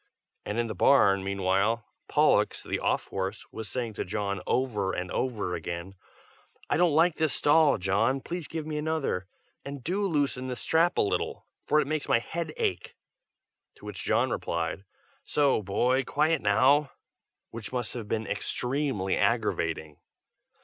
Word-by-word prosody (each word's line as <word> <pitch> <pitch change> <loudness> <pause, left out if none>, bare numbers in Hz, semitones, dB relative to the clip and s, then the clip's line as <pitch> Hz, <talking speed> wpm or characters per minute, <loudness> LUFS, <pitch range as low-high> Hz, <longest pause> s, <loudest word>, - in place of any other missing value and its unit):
and 105 - -2
in 120 - +1
the 115 - -4
barn, 100 -8 +4
meanwhile, 100 +3 +1 0.2
Pollux, - - +3
the - - -2
off - - 0
horse, 95 +2 -4
was 110 -1 -6
saying 120 -3 -3
to - - -3
John, 100 -1 -3
over 105 -7 0
and 90 0 -4
over 110 -8 -1
again, 85 +2 -5 0.8
"I 145 - +3
don't 170 -3 +3
like 165 +1 +4
this 155 -3 +1
stall, 150 0 +4
John! 105 +8 +1
please 170 +3 -5
give 160 -2 -5
me 155 -1 -3
another. 150 -12 -1 0.4
And 140 -2 -7
do 195 +6 0
loosen 140 -6 0
this 125 -1 -4
strap 165 +2 +2
a - - +5
little, 100 - -1 0.2
for 150 - +3
it - - +1
makes 155 0 -3
my - - +5
head 160 +7 -4
ache." 90 -1 -2 0.8
To - - -15
which - - -6
John - - +2
replied, 85 +3 -2 0.4
"So, 140 -6 +2
boy! 125 +7 +1
quiet 155 +3 +1
now!" 135 +8 +4 0.6
which 115 -2 -7
must 125 -3 -2
have 115 -4 -6
been 110 +1 -1
extremely 125 -6 -1
aggravating. 75 -2 0
125 Hz, 155 wpm, -28 LUFS, 100-150 Hz, 0.8 s, a